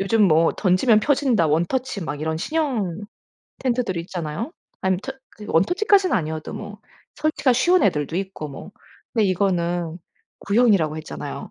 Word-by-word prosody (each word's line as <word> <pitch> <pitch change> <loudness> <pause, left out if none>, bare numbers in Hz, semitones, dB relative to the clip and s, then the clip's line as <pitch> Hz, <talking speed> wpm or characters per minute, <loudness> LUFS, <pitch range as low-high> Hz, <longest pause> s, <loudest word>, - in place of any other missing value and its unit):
요즘 210 +3 +2
뭐 165 -2 +4
"던지면 210 +4 +3
펴진다. 265 - +2
원터치." 195 - -1
막 145 -2 -5
이런 160 +1 -1
신형 230 - -1 0.6
텐트들이 240 -8 -1
있잖아요. 175 - -5 0.3
아니면 190 -1 0
터 270 - -5 0.3
그 210 - -9
원터치까지는 370 - +3
아니어도 155 -3 -4
뭐 - - -8 0.4
설치가 300 -3 +1
쉬운 345 +8 +3
애들도 155 -4 +1
있고 190 -5 -4
뭐. 140 +7 -10 0.4
근데 220 -3 +2
이거는 175 -3 0 0.4
구형이라고 200 -8 +3
했잖아요. 155 - -7
195 Hz, 345 characters per minute, -22 LUFS, 165-250 Hz, 0.6 s, 뭐